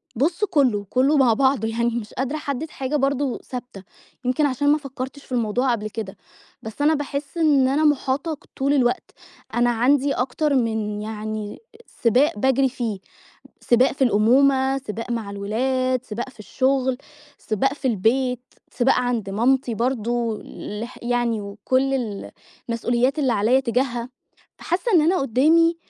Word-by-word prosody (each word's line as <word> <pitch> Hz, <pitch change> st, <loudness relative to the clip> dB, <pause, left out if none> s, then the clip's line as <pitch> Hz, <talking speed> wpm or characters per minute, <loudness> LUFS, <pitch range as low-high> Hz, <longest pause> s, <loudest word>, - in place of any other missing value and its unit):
بُص 335 Hz, -, 0 dB
كله، 260 Hz, -, +1 dB
كله 275 Hz, +4 st, +3 dB
مع 255 Hz, -4 st, +5 dB
بعضه 265 Hz, -2 st, +2 dB
يعني 235 Hz, +1 st, 0 dB
مش 230 Hz, -2 st, -5 dB
قادرة 265 Hz, +3 st, -2 dB
أحدد 295 Hz, 0 st, -4 dB
حاجة 270 Hz, +1 st, -3 dB
برضو 275 Hz, -2 st, 0 dB
ثابتة، 245 Hz, -6 st, -8 dB, 0.4 s
يمكن 255 Hz, +4 st, +2 dB
عشان 285 Hz, +1 st, +1 dB
ما 295 Hz, -, +5 dB
فكرتش 275 Hz, -1 st, -7 dB
في -, -, -23 dB
الموضوع 245 Hz, +2 st, +1 dB
قبل 215 Hz, -2 st, -2 dB
كده، 210 Hz, -2 st, -6 dB, 0.4 s
بس 220 Hz, +6 st, -8 dB
أنا 305 Hz, +2 st, +4 dB
باحس 285 Hz, +1 st, -4 dB
إن 290 Hz, -5 st, +4 dB
أنا 280 Hz, +4 st, +1 dB
محاطة 290 Hz, +1 st, +1 dB, 0.2 s
طول 275 Hz, +1 st, +1 dB
الوقت، 260 Hz, +4 st, +1 dB, 0.4 s
أنا 240 Hz, 0 st, +3 dB
عندي 265 Hz, +4 st, +2 dB
أكتر 275 Hz, +4 st, 0 dB
من 220 Hz, -4 st, -1 dB
يعني 215 Hz, -1 st, -5 dB, 0.4 s
سباق 245 Hz, 0 st, +3 dB
باجري 265 Hz, +2 st, +3 dB
فيه، 230 Hz, -6 st, -4 dB, 0.6 s
سباق 245 Hz, +2 st, +3 dB
في 270 Hz, -, +1 dB
الأمومة، 265 Hz, +4 st, +3 dB
سباق 230 Hz, -2 st, -6 dB
مع 225 Hz, -4 st, -3 dB
الولاد، 255 Hz, +5 st, -1 dB
سباق 235 Hz, +4 st, -5 dB
في 255 Hz, -, -24 dB
الشغل، 260 Hz, +3 st, 0 dB, 0.4 s
سباق 270 Hz, +6 st, -1 dB
في 275 Hz, -2 st, -2 dB
البيت، 250 Hz, +4 st, +1 dB, 0.3 s
سباق 255 Hz, +1 st, +3 dB
عند 245 Hz, -5 st, -1 dB
مامتي 240 Hz, +3 st, +1 dB
برضو، 235 Hz, -1 st, -1 dB, 0.4 s
لح 240 Hz, +2 st, -7 dB
يعني 240 Hz, -2 st, 0 dB
وكل 255 Hz, +7 st, -1 dB
ال 220 Hz, -7 st, -4 dB, 0.4 s
المسئوليات 240 Hz, +4 st, 0 dB
اللي 265 Hz, -4 st, +2 dB
عليّا 230 Hz, +6 st, +3 dB
تجاهها؛ 245 Hz, -1 st, -1 dB, 0.5 s
فحاسة 380 Hz, +7 st, -1 dB
إن 340 Hz, -, +7 dB
أنا 335 Hz, +5 st, +3 dB
قدامي 320 Hz, +7 st, +3 dB
255 Hz, 150 wpm, -22 LUFS, 230-275 Hz, 0.6 s, إن